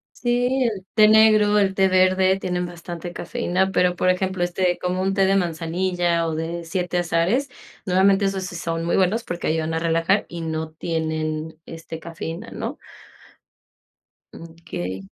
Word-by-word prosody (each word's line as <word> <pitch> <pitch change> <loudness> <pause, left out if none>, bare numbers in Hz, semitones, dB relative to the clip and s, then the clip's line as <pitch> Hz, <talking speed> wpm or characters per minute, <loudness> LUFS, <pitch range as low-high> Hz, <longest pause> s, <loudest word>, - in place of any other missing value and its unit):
Sí, 245 +2 +1
el 190 -3 -8
té 215 -1 +6
negro, 215 -1 +5
el 195 -2 +2
té 190 0 +3
verde 185 +1 +3
tienen 180 -1 -2
bastante 175 0 -7
cafeína, 190 -3 -1
pero, 180 -1 +2
por 185 - +1
ejemplo, 185 0 -1
este, 175 0 0
como 180 +1 -2
un 195 +1 0
té 195 -1 +3
de 195 +1 +3
manzanilla 175 0 0
o 160 - -2
de 165 +2 -4
siete 180 +1 -1
azares, 175 +11 +1 0.4
normalmente 195 +2 +4
esos 195 -1 -1
sí 180 - -6
son 165 -1 -3
muy 170 - +1
buenos 195 +5 +2
porque 175 -5 -4
ayudan 160 0 -1
a 160 - 0
relajar 165 +4 +1
y 170 -1 -6
no 160 -1 -3
tienen, 160 -1 -3
este, 165 0 -8
cafeína, 165 0 -7
¿no? - - -5 1.6
Okey. 130 - -7
180 Hz, 160 wpm, -22 LUFS, 165-190 Hz, 1.6 s, té